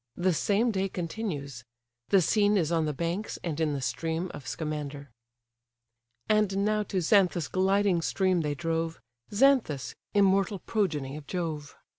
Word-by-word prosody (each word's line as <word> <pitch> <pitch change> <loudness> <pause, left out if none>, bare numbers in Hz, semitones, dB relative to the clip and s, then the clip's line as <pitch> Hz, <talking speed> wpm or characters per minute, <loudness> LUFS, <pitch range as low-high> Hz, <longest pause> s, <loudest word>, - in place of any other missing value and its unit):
The 180 0 +2
same 210 +8 +2
day 195 -1 -1
continues. 160 - -4 0.5
The 195 -3 +5
scene 205 +2 +3
is 170 -3 +1
on 165 -2 +2
the 150 - 0
banks 170 +8 -3
and 160 -3 -3
in 155 -2 +1
the 140 - -3
stream 165 +6 -2
of 135 - -9
Scamander. 150 -4 -5 1.2
And 205 -2 +2
now 215 0 +2
to 195 -3 -2
Xanthus' 175 -3 +3
gliding 190 -1 +2
stream 185 0 +1
they 150 -2 -2
drove, 165 +3 -2 0.3
Xanthus, 215 - +2 0.2
immortal 195 0 +3
progeny 155 -10 -2
of 150 - -11
Jove. 160 -5 -4
175 Hz, 145 wpm, -28 LUFS, 155-200 Hz, 1.2 s, The